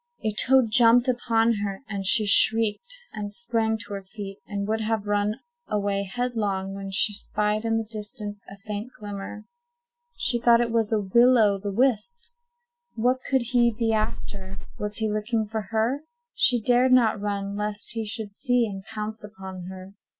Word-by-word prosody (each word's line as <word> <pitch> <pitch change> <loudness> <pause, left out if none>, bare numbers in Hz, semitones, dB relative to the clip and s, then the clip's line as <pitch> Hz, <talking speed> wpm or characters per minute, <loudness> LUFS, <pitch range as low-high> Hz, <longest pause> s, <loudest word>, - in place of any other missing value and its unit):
A 215 -1 0
toad 255 +1 +4
jumped 240 +2 +5
upon 230 -2 +2
her, 200 +3 -4
and 200 -3 -2
she 215 0 +5
shrieked, 225 - +4 0.2
and 205 -1 -5
sprang 225 0 0
to 205 - -8
her 200 - -4
feet, 195 0 -9
and 200 -1 -3
would 220 +1 -1
have 220 -1 -1
run 205 +1 0 0.3
away 200 -1 -1
headlong, 205 -6 -2
when 195 0 -6
she 195 +2 +2
spied 210 +1 -2
in 225 0 +1
the 225 - -1
distance 210 -1 -7
a 200 - -11
faint 210 +3 -5
glimmer. 205 0 -7 0.7
She 240 - 0
thought 235 0 +5
it 235 -1 0
was 225 -2 +1
a 220 - +2
Will 235 +6 +4
o' 205 -3 +3
the 200 +1 -4
wisp. 260 - +1 0.7
What 250 +3 +1
could 265 -3 +2
he 240 -2 +4
be 225 -2 +1
after? 200 -3 -3 0.2
Was 210 0 -3
he 220 0 -1
looking 215 +1 -1
for 220 +1 -3
her? 230 +5 0 0.3
She 245 -2 +4
dared 245 +3 +3
not 225 -4 +4
run, 200 -1 -3
lest 210 0 -2
he 225 0 -3
should 215 -1 -4
see 245 +1 +1
and 195 -3 -6
pounce 215 +1 -6
upon 190 -3 -9
her. 190 +1 -9
215 Hz, 175 wpm, -25 LUFS, 205-235 Hz, 0.7 s, jumped